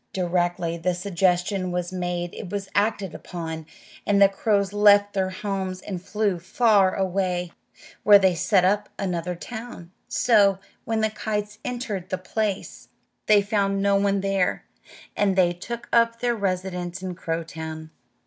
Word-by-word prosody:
Directly 175 -2 0
the 175 +2 -1
suggestion 180 +1 0
was 180 0 -3
made 175 -1 -3
it 180 - -7
was 200 0 -4
acted 200 -3 0
upon, 160 -3 -6 0.4
and 205 -1 +2
the 200 - +8
crows 200 0 0
left 205 0 +5
their 190 -1 0
homes 190 -1 -4
and 185 -2 -6
flew 200 -1 -1
far 195 +1 +3
away, 185 -2 -1 0.5
where 205 0 +8
they 190 -2 +3
set 180 +2 +2
up 205 +2 +1
another 180 -2 -2
town. 220 -3 -8 0.2
So, 205 -5 +4 0.3
when 225 -1 0
the 220 0 +1
kites 210 -1 -4
entered 220 -7 -4
the 185 - -1
place, 200 +2 -3 0.4
they 210 -1 +5
found 195 -1 0
no 200 0 +3
one 200 0 +2
there, 195 -2 0 0.5
and 200 -2 +2
they 180 -2 +3
took 235 +7 -7
up 230 0 +3
their 240 0 0
residence 185 -2 -3
in 185 -1 -3
Crowtown. 160 -2 -5
195 Hz, 150 wpm, -24 LUFS, 180-205 Hz, 0.5 s, the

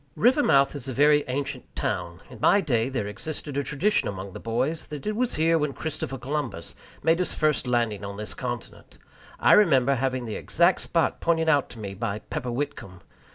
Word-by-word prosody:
Rivermouth 225 - +4
is 140 -3 -6
a 130 - -3
very 145 +3 +4
ancient 135 +2 -4
town. 85 +1 -3
In 125 -4 -12
my 200 - +5
day 125 - 0
there 125 -6 -2
existed 145 +7 -6
a 140 - +1
tradition 150 +10 0
among 95 -1 -6
the - - -7
boys 130 +8 -2
that 150 -2 -7
it 210 0 -1
was 245 +2 0
here 165 +1 +3
Christopher 155 -3 -4
Columbus 130 - -4 0.3
made 165 +1 +3
his 180 - -1
first 155 -4 +1
landing 115 -4 0
on 100 0 -6
this 105 0 -5
continent. 120 -2 -7 0.4
I - - +4
remember 140 -10 +5
having 130 -1 -1
the 110 - -4
exact 170 +2 +2
spot 165 -1 0
pointed 165 -1 +2
out 145 -3 +3
to 115 - -11
me 100 -2 -5
by 100 0 -3
Pepper 120 +3 -5
Whitcomb! 120 -8 -5
135 Hz, 190 wpm, -26 LUFS, 115-155 Hz, 0.4 s, my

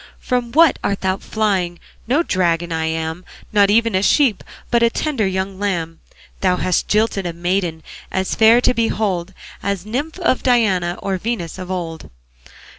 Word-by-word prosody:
From 245 -2 -2
what 320 +2 +5
art 200 - -1
thou 190 0 0
flying? 195 -6 -1 0.3
No 285 +8 +2
dragon 175 - 0
I 160 0 -1
am, 160 +2 -3 0.3
Not 200 -1 +5
even 230 +2 +3
a 190 - +2
sheep, 240 0 +3 0.3
But 235 - +3
a 235 - +5
tender 250 -5 -1
young 190 0 -3
lamb. 170 -5 -2 0.4
Thou 185 -2 +2
hast 180 -1 0
jilted 210 -3 +1
a 170 - -4
maiden 175 -2 -2 0.3
As 190 0 -1
fair 225 +2 +6
to 250 - +3
behold 195 -6 -1 0.3
As 200 -2 -2
nymph 280 +10 -3
of 340 -8 +1
Diana 195 -8 +2
Or 195 -1 -1
Venus 190 -6 -4
of 185 0 -7
old. 170 -3 -5
195 Hz, 165 wpm, -19 LUFS, 175-230 Hz, 0.4 s, fair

